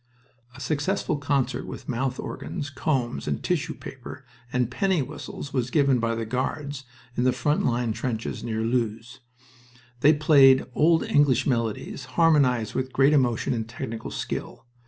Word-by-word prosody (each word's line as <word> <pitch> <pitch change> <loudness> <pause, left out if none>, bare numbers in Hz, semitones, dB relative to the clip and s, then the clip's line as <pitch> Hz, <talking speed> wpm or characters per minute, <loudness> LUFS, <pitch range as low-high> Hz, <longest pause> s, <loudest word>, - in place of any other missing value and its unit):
A - - -11
successful 150 +6 -1
concert 135 -3 -1
with - - -8
mouth 130 +1 -2
organs, 145 0 -5
combs, 130 -3 -1
and - - -2
tissue 165 -2 -1
paper 135 +1 -10 0.3
and 125 -1 0
penny 190 0 +1
whistles 145 0 -8
was 125 -2 0
given 140 -2 +3
by 115 0 0
the 115 0 -3
Guards 130 +3 -3 0.3
in 120 - 0
the 130 - +4
front 145 +5 0
line 120 -2 0
trenches 115 -2 -4
near 110 -2 -2
Loos. 115 +1 -2 0.8
They 150 +3 +6
played 140 -4 +6
old 160 +4 +4
English 135 -3 +3
melodies, 115 +1 -2
harmonized 135 -10 +3
with 130 0 -2
great 140 +2 +4
emotion 125 -6 +2
and 115 -1 -3
technical 115 -2 -6
skill. - - -5
130 Hz, 150 wpm, -25 LUFS, 120-145 Hz, 0.8 s, They